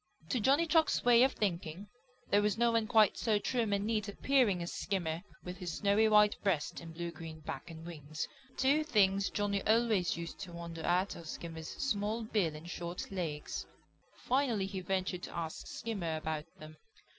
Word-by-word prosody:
To 250 - +1
Johnny 275 +9 +4
Chuck's 325 -4 +3
way 240 -1 +7
of 265 +1 +5
thinking, 180 -1 -2 0.4
there 205 - +5
was 210 +1 +1
no 235 0 +4
one 225 -1 +1
quite 220 -3 +4
so 220 -3 +2
trim 225 +1 0
and 200 0 +1
neat 215 -1 0
appearing 205 -4 +2
as 170 - -5
Skimmer 175 -4 -2 0.2
with 180 +1 -6
his 175 -3 -4
snowy 205 +2 +4
white 210 -1 +6
breast 180 -8 0
and 165 -1 -9
blue 170 +1 -4
green 160 -1 -9
back 150 +2 -6
and 165 0 -9
wings. 155 -2 -5 0.3
Two 280 +4 +3
things 200 -7 +3
Johnny 200 -1 0
always 220 -6 +2
used 170 0 -6
to 180 -3 -7
wonder 170 -1 -6
at, 180 +4 +1 0.2
Skimmer's 160 -1 -6
small 215 -2 -1
bill 200 -8 0
and 155 +3 -9
short 175 +1 -5
legs. 160 -6 -4 0.5
Finally 245 -6 +1
he 195 0 -4
ventured 185 0 -1
to - - -7
ask 160 -2 -4
Skimmer 195 -8 -3
about 155 -1 -3
them. 155 0 -11
195 Hz, 180 wpm, -33 LUFS, 170-220 Hz, 0.5 s, way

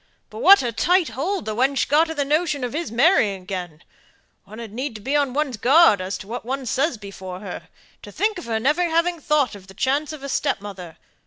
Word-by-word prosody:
"But - - -8
what 400 - +7
a 240 - -1
tight 350 +8 +2
hold 325 - -3
the 215 - -3
wench 265 +4 +1
got 315 +3 +3
of 320 - -6
the 285 - 0
notion 305 -1 0
of 245 - -3
his 320 -4 -3
marrying 230 - +3
again! 180 -4 -6 0.6
One 210 +2 -12
had 225 -3 -8
need 235 -3 -5
be 275 +3 -1
on 285 -3 +2
one's 275 -3 -2
guard 255 - +5
as 185 +1 -4
to 195 - -11
what 240 +3 -5
one 265 +3 -4
says 270 +3 0
before 190 -3 -9
her. 195 -4 -8 0.3
To - - -11
think 420 -2 -1
of - - -10
her 225 -1 -1
never 305 +9 +1
having 335 +1 +1
thought 295 -4 +1
of 195 -2 -12
the 190 - -14
chance 280 +3 0
of 305 -3 -9
a - - -4
stepmother. 200 - -3
265 Hz, 225 wpm, -22 LUFS, 210-310 Hz, 0.6 s, what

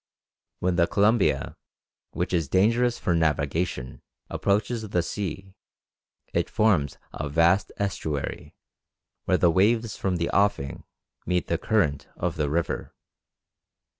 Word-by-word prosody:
When 90 -1 +1
the 85 -1 +4
Columbia, 105 +2 +2 0.5
which - - -3
is 80 -5 0
dangerous 115 +7 +3
for 90 - 0
navigation, 75 -3 -1 0.3
approaches 105 +2 0
the 90 -3 +1
sea, 95 +1 -5 0.8
it - - 0
forms 95 - +2 0.2
a 75 - -4
vast 85 +6 +3
estuary, 80 -8 -3 0.7
where - - +3
the 85 - +4
waves 110 +4 +2
from 95 -2 -1
the 85 -1 -1
offing 100 -9 0 0.4
meet 90 -1 0
the 85 - 0
current 75 -11 +1
of 90 -1 -2
the 75 -3 -1
river. 85 +3 -2
90 Hz, 120 wpm, -26 LUFS, 80-100 Hz, 0.8 s, the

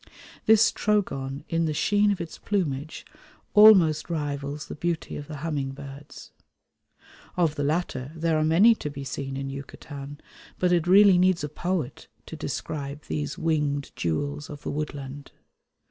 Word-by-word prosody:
This 225 0 +6
Trogon 140 -10 -1
in 165 0 0
the 155 -1 -1
sheen 205 +6 +3
of 200 - 0
its 170 -1 -7
plumage 155 -7 -2 0.5
almost 190 -9 +7
rivals 145 -2 -3
the - - -7
beauty 170 +1 -3
of 145 - -7
the 150 - -7
humming 140 -4 -2
birds. 140 +1 -11 1.1
Of 165 -4 +2
the 145 -2 -3
latter 145 -3 -2
there 165 0 0
are - - +2
many 175 +9 +6
to 150 - -5
be 140 -1 -7
seen 135 +1 -5
in 135 0 -4
Yucatan, 140 +1 -9 0.4
but 180 -1 +1
it 175 -1 +2
really 195 0 +7
needs 185 -3 +3
a 150 - -3
poet 175 -2 -3 0.2
to - - -8
describe 145 0 -5
these 75 -2 -4
winged 150 -3 -1
jewels 145 - -2
of 145 -1 -9
the - - -3
woodland. 145 -2 -6
150 Hz, 155 wpm, -26 LUFS, 140-175 Hz, 1.1 s, almost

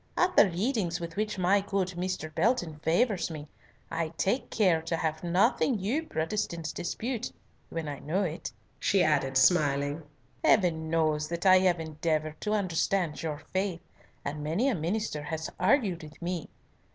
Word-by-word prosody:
At 365 +1 +2
the 200 - +7
readings 185 -1 -1
with 170 -1 -6
which 210 0 -1
my 190 +2 +3
good 195 -2 -1
Mr. 180 -3 -4
Belton 175 -4 +1
favours 185 +5 +1
me, 155 -2 -7 0.4
I 165 -1 -1
take 230 +8 0
care 180 -7 +3
to 165 +1 -2
have 160 0 -2
nothing 200 +8 +2
you 250 - -1
Protestants 165 -1 -2
dispute 220 +7 -3 0.4
when 165 -2 -4
I 145 -1 -5
know 180 +7 0
it." 170 0 -4 0.3
She 195 -2 +3
added, 140 -4 +2
smiling, 145 0 +3 0.4
"Heaven 165 -6 +3
knows 155 -2 +1
that 170 +3 -4
I 185 -1 +8
have 180 -2 +2
endeavoured 155 -1 -2
to 210 - -1
understand 185 -4 0
your 155 -2 -4
faith, 190 -2 -1 0.4
and 150 +1 -4
many 175 - +1
a - - +1
minister 175 -2 -2
has 160 +2 -4
argued 195 - +2
with 155 -1 -12
me. 175 -2 -3
170 Hz, 160 wpm, -29 LUFS, 155-195 Hz, 0.4 s, I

